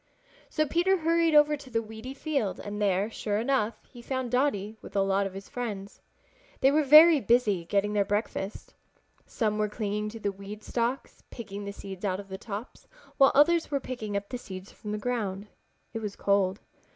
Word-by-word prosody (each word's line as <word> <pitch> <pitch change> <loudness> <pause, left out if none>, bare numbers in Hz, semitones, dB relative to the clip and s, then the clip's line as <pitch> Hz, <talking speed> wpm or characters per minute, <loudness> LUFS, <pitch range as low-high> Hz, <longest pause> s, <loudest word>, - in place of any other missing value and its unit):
So 310 - +1
Peter 350 +6 +2
hurried 330 -1 +2
over 300 0 +6
to 280 -2 -12
the 230 -2 -1
weedy 220 +5 -8
field 275 - -2
and 205 0 -5
there, 195 0 +2
sure 205 -2 -2
enough, 235 -1 +1
he 245 - -13
found 260 -1 -3
Dotty 225 -6 0
with 200 - -12
a 200 - +3
lot 195 0 +1
of 190 - -10
his 195 0 -8
friends. 205 -5 -6 0.6
They 270 - +5
were 305 +2 +4
very 305 +2 +8
busy 210 -6 +2
getting 205 +3 0
their 205 -1 +3
breakfast. 205 0 -3 0.5
Some 215 -3 -1
were 210 0 +1
clinging 210 0 -2
to 225 +1 -9
the 205 -2 -1
weed 200 +2 -9
stalks 240 +3 -2
picking 205 -3 -7
the 200 - -4
seeds 195 -1 -9
out 190 -2 0
of 200 -1 -10
the 190 0 -6
tops, 215 +2 -8 0.3
while 270 -2 +6
others 325 +4 +4
were 280 - 0
picking 220 -6 -4
up 200 0 -5
the 250 - -4
seeds 190 -3 -9
from 210 - -8
the 210 - -2
ground. 210 -4 -2 0.5
It 225 - -3
was 210 -2 -5
cold. 200 -1 +1
215 Hz, 195 wpm, -28 LUFS, 200-260 Hz, 0.6 s, very